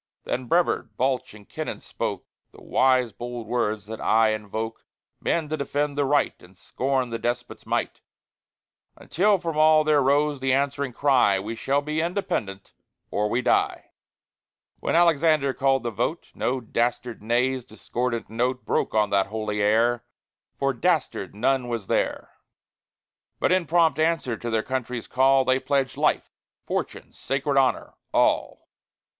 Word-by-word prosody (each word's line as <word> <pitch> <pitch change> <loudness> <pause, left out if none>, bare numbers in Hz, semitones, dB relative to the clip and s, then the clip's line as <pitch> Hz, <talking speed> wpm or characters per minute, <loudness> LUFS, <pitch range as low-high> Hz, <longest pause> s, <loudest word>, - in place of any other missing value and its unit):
Then 125 0 -3
Brevard, 170 +6 +1
Balch, 130 -2 -1
and 105 -1 -15
Kennon - - -5
spoke - - -4 0.3
The - - -15
wise 130 -2 +2
bold 120 +3 -6
words 110 -3 -1
that 110 +1 -7
aye 110 0 +4
invoke 110 +1 -4 0.4
Men 165 -2 0
to 155 - -2
defend 145 0 -1
the 145 -1 +1
right 145 +1 +2
And 90 +1 -18
scorn 130 -2 -2
the 115 - -3
despot's 120 0 -4
might; - - -2 1.0
Until 200 +4 +2
from 165 -3 -4
all 155 0 +6
there 150 -1 +3
rose 145 +1 +2
the 130 0 +1
answering 140 0 0
cry: 125 -6 +3
"We 110 +4 -5
will 140 +1 +3
be 155 +2 -1
independent, 165 - -3 0.4
or 105 +1 0
we 120 +3 0
die." - - +1 0.9
When - - -1
Alexander 155 -4 +3
called 135 -2 +1
the 120 - -2
vote, 125 +9 -3
No 130 +1 -1
dastard 120 0 -2
"nay's" 125 +3 0
discordant 120 -1 -3
note 125 +3 -2
Broke - - -1
on 105 -1 +2
that 100 -1 +2
holy 105 0 -3
air 115 +3 +2 0.5
For 135 0 0
dastard 150 - -1
none 125 +3 +1
was 115 -4 -3
there! - - -2 1.0
But - - +2
in 185 -3 +2
prompt 160 -2 +3
answer 160 -7 +1
to 120 +2 -5
their 110 -1 0
country's 125 -2 -3
call, 135 +1 +3
They 130 +1 +3
pledged 135 0 0
life, - - 0 0.3
fortune, - - -4
sacred 140 +1 -2
honor 135 -2 +1 0.2
all! - - +1
130 Hz, 150 wpm, -25 LUFS, 115-145 Hz, 1.0 s, all